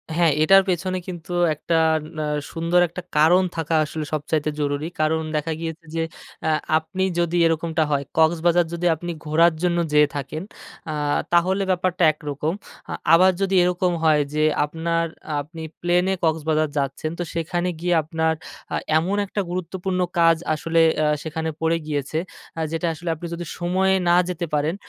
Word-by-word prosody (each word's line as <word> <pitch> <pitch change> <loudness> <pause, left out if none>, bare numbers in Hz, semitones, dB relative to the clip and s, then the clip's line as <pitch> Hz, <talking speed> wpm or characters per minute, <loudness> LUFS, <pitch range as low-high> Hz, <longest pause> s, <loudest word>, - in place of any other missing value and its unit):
হ্যাঁ, 170 -2 +4
এটার 195 +3 +7
পেছনে 185 +1 -1
কিন্তু 175 -1 -7 0.2
একটা 155 +2 -2 0.4
না 155 - -1 0.3
সুন্দর 165 +2 +1
একটা 170 +2 -7 0.2
কারণ 170 +5 +5
থাকা 165 -1 -1
আসলে 155 0 -5
সবচাইতে 155 0 -1
জরুরি। 145 +1 -1
কারণ 155 +1 +2
দেখা 150 +2 -1
গিয়েছে 165 0 -6
যে, 165 - 0 0.4
আ - - +3 0.3
আপনি 160 +4 -3 0.2
যদি 170 0 +1
এরকমটা 165 0 +1
হয়, 140 -1 +1
কক্সবাজার 170 +2 +3
যদি 170 +1 -3
আপনি 175 +2 -5
ঘোরার 165 +2 +4
জন্য 175 -1 +2
যেয়ে 150 0 +5
থাকেন, 145 +2 -4 0.5
আ - - -3 0.4
তাহলে 185 +3 +3
ব্যাপারটা 185 0 0
একরকম। 150 +1 -3 0.4
আ - - -2 0.2
আবার 185 +3 +7
যদি 195 0 +1
এরকম 180 0 +1
হয় 155 -2 +4
যে, 155 0 +1 0.2
আপনার 165 +2 -1 0.4
আপনি 160 +3 -10 0.2
প্লেনে 180 +2 +2
কক্সবাজার 155 -1 +1
যাচ্ছেন, 140 +3 -2
তো - - 0
সেখানে 175 +2 -1
গিয়ে 175 +1 +1
আপনার 160 +1 0 0.4
আ - - +1 0.2
এমন 180 +5 0
একটা 205 +1 -2
গুরুত্বপূর্ণ 185 +1 -3 0.2
কাজ 165 -1 +5 0.2
আসলে 165 +2 +1 0.2
আ - - +3 0.2
সেখানে 160 0 -3
পড়ে 165 +1 +2
গিয়েছে 145 0 -2 0.4
আ - - -1
যেটা 165 +1 -1
আসলে 170 +2 -6
আপনি 165 +3 -8
যদি 175 +1 -5
সময়ে 190 +2 +2
না 175 - +5
যেতে 175 -1 -3
পারেন, 150 +3 +1
165 Hz, 160 wpm, -23 LUFS, 155-175 Hz, 0.5 s, এটার